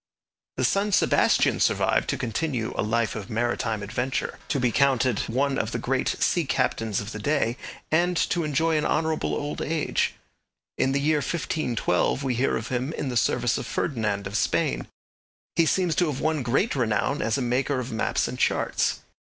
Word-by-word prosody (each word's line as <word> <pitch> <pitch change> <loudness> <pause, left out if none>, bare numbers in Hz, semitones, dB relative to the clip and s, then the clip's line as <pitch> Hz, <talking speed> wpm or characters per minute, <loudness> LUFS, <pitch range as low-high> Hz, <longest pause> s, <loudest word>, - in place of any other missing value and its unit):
The - - 0
son 200 +1 +1
Sebastian - - +3
survived - - +2
to - - 0
continue 120 0 -2
a - - 0
life 110 +1 0
of 105 -3 -6
maritime 115 -1 -1
adventure, 120 +4 -2
to 140 - 0
be 125 -2 +2
counted 130 -3 +2
one 135 +3 +1
of - - -2
the - - 0
great - - -1
sea - - +2
captains 110 -3 0
of 105 +1 -6
the 110 - -6
day, 120 -1 +1 0.4
and 175 +2 +2
to 175 - +1
enjoy 155 +2 +1
an 150 - -1
honourable 160 0 0
old 145 0 -4
age. 160 0 0 0.6
In 135 - +1
the 140 - +2
year 150 +2 +2
1512 140 - 0
we 130 -2 0
hear 125 +3 +1
of 115 - -6
him 130 +4 -2
in 140 - -3
the 125 - -3
service 120 +1 +1
of - - -6
Ferdinand 110 -6 -1
of 100 +1 -5
Spain. - - 0 0.7
He 165 - +3
seems 180 0 +2
to 175 - +3
have 145 -3 -3
won 155 -1 0
great 135 - +1
renown 120 +2 0
as 110 -1 0
a 135 - -1
maker 130 +3 0
of 130 0 -5
maps 110 - 0
and - - -6
charts. - - +1
130 Hz, 185 wpm, -25 LUFS, 115-150 Hz, 0.7 s, Sebastian